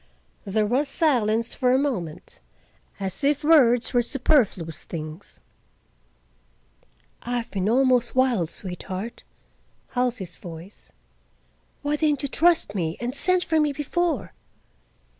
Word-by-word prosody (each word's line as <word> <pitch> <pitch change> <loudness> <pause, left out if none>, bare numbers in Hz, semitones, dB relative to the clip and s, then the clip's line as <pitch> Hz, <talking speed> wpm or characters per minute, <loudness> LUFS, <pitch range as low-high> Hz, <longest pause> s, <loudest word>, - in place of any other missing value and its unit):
There 210 +2 +1
was 260 +7 +1
silence 230 -8 +2
for 250 -2 +1
a 260 - +4
moment, 205 - -3 0.6
as 195 +7 -3
if 290 +1 +2
words 255 -7 +4
were 245 - +4
superfluous 235 - +1
things. 155 +2 -8 1.8
"I 245 +1 -2
have 235 - -5
been 195 0 -1
almost 250 -1 +3
wild, 245 -11 +2
sweetheart,"—Halsey's 195 +2 -6
voice. 170 +2 -11 0.9
"Why 295 +1 0
didn't 295 -2 +1
you 280 - -1
trust 330 -8 +3
me, 165 -4 -2
and 240 +1 -3
send 365 +5 +2
for 320 -2 +1
me 300 -2 +2
before?" 295 - -2
245 Hz, 115 wpm, -24 LUFS, 195-285 Hz, 1.8 s, a